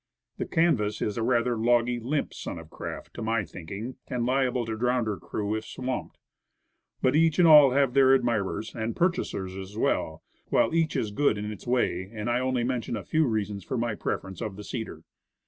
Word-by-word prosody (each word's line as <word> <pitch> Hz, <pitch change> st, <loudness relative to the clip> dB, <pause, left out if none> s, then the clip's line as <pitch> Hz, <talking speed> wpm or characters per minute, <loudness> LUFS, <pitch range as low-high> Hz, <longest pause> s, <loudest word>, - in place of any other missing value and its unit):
The -, -, -2 dB
canvas 110 Hz, -11 st, +1 dB
is 105 Hz, +1 st, -2 dB
rather 120 Hz, +1 st, +2 dB
a -, -, -2 dB
logy, 120 Hz, +1 st, +2 dB
limp 140 Hz, +6 st, -2 dB
sort -, -, -6 dB
of 80 Hz, -1 st, -11 dB
craft, -, -, -7 dB
to -, -, -7 dB
my 110 Hz, -2 st, 0 dB
thinking, 100 Hz, +9 st, -7 dB
and 120 Hz, -2 st, -2 dB
liable 130 Hz, -1 st, +1 dB
to 110 Hz, 0 st, -3 dB
drown 125 Hz, +1 st, +1 dB
her 105 Hz, -3 st, -2 dB
crew 105 Hz, +5 st, -3 dB
if 110 Hz, 0 st, -2 dB
swamped. 130 Hz, +2 st, -5 dB, 0.9 s
But 130 Hz, -, +3 dB
each 160 Hz, -1 st, +4 dB
and 175 Hz, -, +6 dB
all 150 Hz, -3 st, +9 dB
have 135 Hz, -2 st, +3 dB
their 135 Hz, -1 st, +6 dB
admirers, 110 Hz, -4 st, -1 dB
and 115 Hz, 0 st, -3 dB
pur 180 Hz, +1 st, +3 dB
chasers 95 Hz, -, -5 dB
as 95 Hz, +2 st, -8 dB
well, -, -, 0 dB, 0.2 s
while -, -, +2 dB
each 165 Hz, -2 st, +1 dB
is 110 Hz, -, -1 dB
good 110 Hz, 0 st, +2 dB
in 105 Hz, +1 st, -4 dB
its 105 Hz, -, -10 dB
way, 95 Hz, -7 st, 0 dB
and 110 Hz, +1 st, -3 dB
I 120 Hz, -, +2 dB
only 130 Hz, -1 st, 0 dB
mention 120 Hz, -2 st, -2 dB
a -, -, -6 dB
few 160 Hz, -2 st, +2 dB
reasons 105 Hz, -3 st, -2 dB
for 130 Hz, -, -3 dB
my 120 Hz, -1 st, 0 dB
preference 95 Hz, -3 st, -4 dB
of 110 Hz, -4 st, -4 dB
the 105 Hz, -, -8 dB
cedar. 105 Hz, -9 st, -6 dB
120 Hz, 205 wpm, -27 LUFS, 105-130 Hz, 0.9 s, all